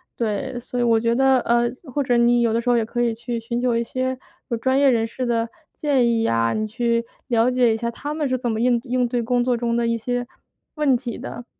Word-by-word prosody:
对， 240 +3 -2
所 245 +1 -5
以 245 - +2
我 230 -1 +3
觉 230 +1 +1
得， 265 0 +4
呃， 235 0 +2 0.3
或 285 - +1
者 250 -2 +1
你 240 0 +4
有 230 -2 +2
的 230 - +1
时 245 - -2
候 240 - +4
也 225 - +1
可 240 +2 -3
以 235 -2 +1
去 235 +1 -4
寻 235 +1 -3
求 245 -1 +1
一 235 - +1
些 255 +1 -3 0.3
有 235 - -1
专 260 +3 +1
业 280 - +5
人 230 -2 +1
士 255 +3 -4
的 230 -1 0 0.2
建 275 -5 +1
议 230 -1 +2
呀， 115 - +1
你 215 0 -1
去 235 +1 0 0.2
了 235 -1 +3
解 250 -3 +3
一 - - -1
下 235 +1 -2
他 290 +5 -5
们 300 -3 -1
是 255 - +1
怎 240 -1 -2
么 220 +1 -2
应 245 -1 +3
应 250 -1 0
对 240 0 -1
工 245 +1 +1
作 245 -1 +1
中 235 0 -1
一 230 - +1
些 245 +1 -3 0.5
问 295 -4 +3
题 240 -2 -6
的， 240 - -8
240 Hz, 275 characters per minute, -22 LUFS, 230-255 Hz, 0.5 s, 业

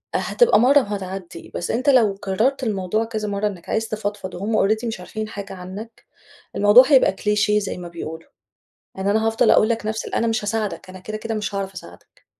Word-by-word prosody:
هتبقى 485 - +3
مرة 275 +4 +6
وهتعدي، 190 -6 -6
بس 175 - -2
أنت 255 +5 +1
لو 230 -7 +5
كررت 220 +8 0
الموضوع 210 0 -1
كذا 215 -2 -4
مرة، 200 +1 -1
إنك 185 -5 -8
عايز 225 0 0
تفضفض 205 -3 -4
وهُم 205 +2 +1
Already 220 +2 0
مش 225 -5 -4
عارفين 215 +4 -5
حاجة 200 -2 -7
عنك، 190 +5 -9 0.5
الموضوع 205 +5 +7
هيبقى 270 -4 +5
كليشيه 210 +1 +1
زي 195 -2 -4
ما 175 - -7
بيقولوا 165 -1 -8 0.7
إن 190 +1 -2
أنا 220 +2 +2
هافضل 225 0 +3
أقول 215 - +4
لك 225 -2 -1
نفس 220 0 -3
ال - - -5
أنا 230 - +1
مش 225 -1 0
هاساعدك 210 -3 -3
أنا 185 0 -10
كده، 215 +3 -6
كده 225 0 -4
مش 210 -1 -3
هاعرف 195 -1 -3
أساعدك، 90 - -14
210 Hz, 200 wpm, -22 LUFS, 190-225 Hz, 0.7 s, الموضوع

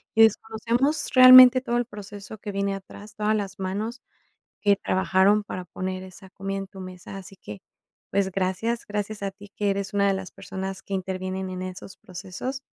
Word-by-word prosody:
Y 225 - +7
desconocemos 230 +7 +1
realmente 255 0 +10
todo 240 -2 -1
el 240 - 0
proceso 205 -1 -10
que 205 - -6
viene 200 0 -1
atrás, 200 +2 -10
todas 215 +1 +1
las 195 -2 -4
manos 210 +6 -3 0.6
que 205 -1 +4
trabajaron 190 +2 +2
para 185 -3 -6
poner 185 0 -4
esa 190 +1 -13
comida 195 +1 -5
en 195 - -5
tu 195 0 -12
mesa. 185 +1 -9
Así 195 0 -12
que, 105 - -10 0.5
pues, 195 -1 +1
gracias. 195 +6 -1
Gracias 210 0 -4
a 195 - -1
ti 200 +1 -15
que 205 - -1
eres 195 0 -2
una 200 -1 +2
de 195 - +2
las 190 -1 -6
personas 190 0 -6
que 200 - -5
intervienen 185 0 -3
en 185 0 -5
esos 185 +1 -8
procesos. 190 +9 -6
195 Hz, 185 wpm, -25 LUFS, 190-215 Hz, 0.6 s, realmente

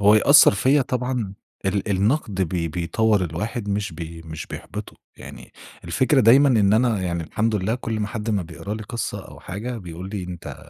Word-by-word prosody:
...هو 105 +1 +6
يأثّر 140 0 +7
فيّا 135 +8 +3
طبعًا 125 -5 -2 0.3
ال 95 - +1
ال 100 +1 -1
النقد 110 +2 +1
بي - - +3
بي 85 -1 -2
بيطور 90 +6 +1
الواحد 105 +7 -4
مش 100 -2 -2
بي 80 0 -8
مش 80 -1 -7
بيحبطُه، - - -8 0.2
يعني - - -11 0.3
الفكرة 130 +1 +2
دايمًا 130 +5 +6
إن 105 -5 +4
أنا 110 -3 +2
يعني 85 -2 -2
الحمد 110 +6 -1
لله 105 +3 0
كل 115 -3 -3
أما 105 -1 -1
حد 110 0 -4
ما 100 -4 0
بيقرا 85 +5 -6
لي 110 - -6
قصّة 115 +2 -4
أو - - -13
حاجة، 115 +6 -5
بيقول 90 0 -8
لي 100 -3 -4
أنت 90 -1 -7
105 Hz, 195 wpm, -23 LUFS, 90-115 Hz, 0.3 s, يأثّر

